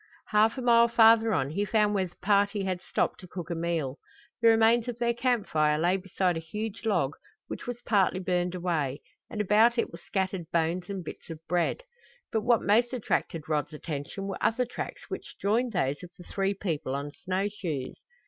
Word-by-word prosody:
Half 215 +3 +3
a 255 - -3
mile 235 -1 +6
farther 225 -1 +6
on 135 -7 0
he 200 +6 0
found 210 0 +2
where 190 -2 +1
the 175 - -20
party 200 0 +2
had 185 -2 -2
stopped - - -1
to 185 - -11
cook 175 -1 -7
a - - -1
meal. 165 -5 -2 0.4
The 230 - +5
remains 225 +1 +5
of 245 -2 -4
their 235 0 +1
camp 240 -2 +1
fire 150 -1 +2
lay 175 +4 +2
beside 185 -1 -1
a - - -2
huge 210 +7 -6
log, 175 -10 +1 0.3
which - - -7
was 245 -1 -5
partly 195 -4 +2
burned 180 -1 -1
away, 160 -6 -2 0.3
and 220 - -6
about 215 +4 +4
it - - 0
were - - -10
scattered 190 -4 -3
bones 170 +2 0
and 195 -2 -4
bits - - -9
of 160 -1 -7
bread. 175 - 0 0.5
But 220 - +1
what 235 0 +3
most 235 +4 +3
attracted 170 - -2
Rod's 150 -1 -1
attention 150 +5 -5
were 195 -1 -4
other 250 +3 +2
tracks - - -7
which - - -7
joined 230 +5 +1
those 145 -8 -1
of 180 - -9
the 175 - -11
three 195 +2 -1
people 155 -9 -2
on 140 +1 -4
snow 190 +3 -2
shoes. 165 -10 -5
195 Hz, 200 wpm, -28 LUFS, 170-225 Hz, 0.5 s, mile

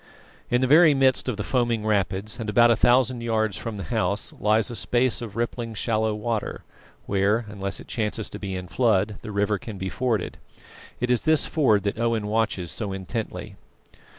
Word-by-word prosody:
In 125 +1 +2
the - - +3
very 155 +2 +6
midst 130 -1 +2
of 115 - -3
the 105 - -3
foaming 120 -2 0
rapids, 100 +1 -1
and 110 -2 -4
about 120 +2 +5
a - - +4
thousand 125 +1 +3
yards 110 -3 0
from 115 -2 -5
the 100 - -5
house 100 -2 -1
lies 110 +2 +2
a - - -5
space 120 +2 +1
of 110 -4 -7
rippling 115 -1 -3
shallow 110 0 0
water, 110 0 -3 0.4
where, 100 +4 +1
unless 100 -2 -4
it - - -12
chances 110 -1 -2
to 105 - -7
be 95 -2 -4
in 90 0 -6
flood, 105 -3 +1
the 110 - -7
river 100 0 0
can 105 +1 -8
be 95 0 -4
forded. 120 +2 -2 0.6
It 125 +1 0
is 125 - +2
this 155 -1 +4
ford 110 -10 +2
that 100 +2 -2
Owen 115 -2 0
watches 105 -5 -1
so 105 -3 -4
intently. 95 +4 -5
110 Hz, 190 wpm, -24 LUFS, 105-120 Hz, 0.6 s, very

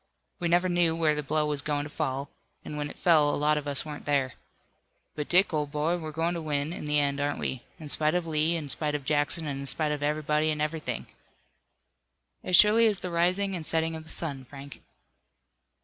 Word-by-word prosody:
We 175 - 0
never 175 +2 +3
knew 175 -2 +2
where 160 -2 +2
the 150 - -1
blow 150 +1 0
was 150 -1 -2
going 145 0 -1
to 150 - -7
fall, 135 +1 -3 0.3
and 150 - -6
when 145 0 -3
it - - -10
fell 155 -4 +4
a - - 0
lot 150 +1 +2
of 150 -1 -3
us 140 0 -1
weren't 150 -1 -7
there. 140 -3 +1 0.8
But, 150 -1 -5
Dick, 180 0 +4
old 150 -2 -1
boy, 150 +4 0
we're 160 -2 -6
going 165 +3 0
to 170 - -3
win, 150 0 -1
in - - -6
the 150 0 +3
end, 140 0 +1
aren't 145 0 0
we, 130 - -3 0.2
in 155 - -8
spite 155 +2 +1
of 180 -1 0
Lee, 160 +1 +1
in 155 -3 -3
spite 150 +1 -2
of 145 -2 -4
Jackson, 150 +2 0
and 140 -2 -3
in 140 - -5
spite 150 +4 0
of 150 -1 -3
everybody 150 +1 +1
and 155 -1 -1
everything?" 155 +1 -2 1.4
"As 185 - +3
surely 215 +4 +7
as 210 -2 +2
the 180 -1 -5
rising 185 +3 +1
and 170 - -4
setting 160 +1 0
of 160 - -7
the 160 - -15
sun, 140 -5 -3
Frank." 140 +2 -11
150 Hz, 225 wpm, -28 LUFS, 145-165 Hz, 1.4 s, surely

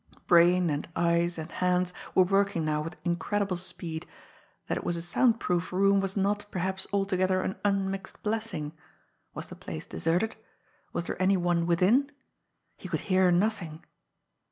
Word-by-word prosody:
Brain 175 0 +5
and 145 +2 -3
eyes 170 0 +2
and 160 0 -6
hands 180 0 +1 0.2
were 185 - +7
working 195 -3 +1
now 150 -1 0
with 165 +3 -6
incredible 195 +3 0
speed. 170 -2 -5 0.6
That - - 0
it - - -4
was 175 - -1
a - - -3
sound 230 +6 +2
proof 180 -3 -1
room 195 +2 +4
was 195 +1 -2
not, 205 +1 +1
perhaps, 190 +1 -3
altogether 190 -2 +1
an 190 - -3
unmixed 195 0 -2
blessing! 215 -9 -2 0.6
Was - - -6
the - - -8
place - - -7
deserted? 175 +7 0 0.6
Was 170 - -3
there - - -4
any 190 +1 +4
one 175 -1 +1
within? 195 +12 +3 0.7
He - - -8
could - - -1
hear 185 -1 +3
nothing. 175 -4 0
185 Hz, 155 wpm, -28 LUFS, 170-195 Hz, 0.7 s, were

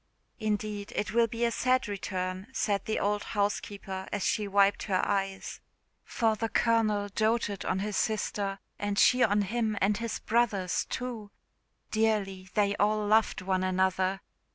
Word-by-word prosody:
"Indeed 210 -1 -2
it 210 - -2
will 235 0 +4
be 230 +1 -1
a 235 - +1
sad 255 +1 +1
return," 185 -1 -4
said 200 -6 0
the 220 - -1
old 205 +1 0
housekeeper, 200 -2 -3
as 205 -2 -1
she 210 -1 0
wiped 200 0 +3
her 185 -1 +2
eyes; 195 -1 -2 0.4
"for 225 -2 +1
the 225 +1 -2
Colonel 215 -4 +2
doated 215 -1 0
on - - 0
his 205 +1 -2
sister, 205 -3 -1 0.2
and 205 -1 -2
she 250 +4 +5
on 205 -2 +4
him, 220 +1 -1
and 200 +1 +2
his 230 -1 -3
brothers 215 -6 +1
too! 240 -5 -5 0.6
Dearly 205 -4 0
they 205 -1 +2
all 210 +1 +2
loved 215 -2 +2
one 185 0 0
another. 185 +1 +1
205 Hz, 155 wpm, -29 LUFS, 195-220 Hz, 0.6 s, she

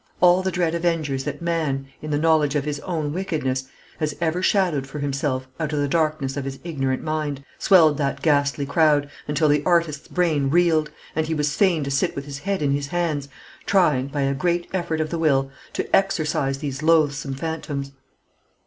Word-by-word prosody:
All 180 +1 +5
the 190 - -1
dread 175 -3 0
avengers 165 -6 -1
that 150 +2 -5
man, 155 -5 -1 0.2
in 155 - -6
the 145 - +1
knowledge 155 -2 +3
of 145 -1 0
his 145 -1 -3
own 155 -4 -3
wickedness, 150 -8 -2 0.3
has 150 -2 -1
ever 170 +1 0
shadowed 180 -9 +1
for 150 - -8
himself 140 -2 -2
out 155 -1 -2
of - - 0
the 145 - +1
darkness 155 -3 0
of 140 - -3
his 135 0 -5
ignorant 135 -6 -2
mind, 150 -3 -3
swelled 160 -6 +5
that 140 -1 -1
ghastly 145 -2 +2
crowd, 145 -1 +2 0.2
until 150 +1 +2
the 145 0 +3
artist's 165 -4 +1
brain 155 -6 +1
reeled, 160 -1 +3 0.3
and 160 0 0
he 160 - -1
was 150 -1 0
fain 180 -7 +3
to 140 - -3
sit 140 - 0
with 140 - -5
his 140 -1 -7
head 195 0 -2
in 140 - +2
his 140 0 -1
hands, 155 -4 -2 0.4
trying, 150 -9 +3
by 140 0 -3
a 135 0 +1
great 175 +5 0
effort 170 -4 -1
of 155 - -3
the 170 - -2
will, 135 -4 +2 0.2
to - - 0
exorcise 155 -7 +1
these 140 -1 -5
loathsome 150 -4 +2
phantoms. 145 -2 -4
150 Hz, 195 wpm, -23 LUFS, 140-165 Hz, 0.4 s, All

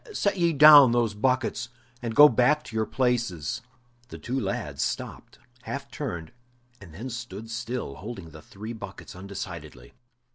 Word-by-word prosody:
Set 200 - 0
ye 170 -2 +2
down 145 -4 +9
those 120 -3 +1
buckets, 130 +3 -1 0.3
and 115 -2 -4
go 145 +4 +10
back 145 +5 +2
to 110 - -11
your 110 -1 0
places!" 120 - -1 0.5
The - - -9
two 130 +3 -3
lads 100 -5 -3
stopped, - - -4 0.2
half - - -6
turned, 80 -2 -5 0.5
and 95 -4 -12
then 105 +11 -7
stood 115 -1 -7
still, 120 - -4
holding 95 -6 -8
the 80 0 -12
three 105 +8 -9
buckets 100 -5 -10
undecidedly. 90 -9 -8
115 Hz, 150 wpm, -26 LUFS, 100-130 Hz, 0.5 s, go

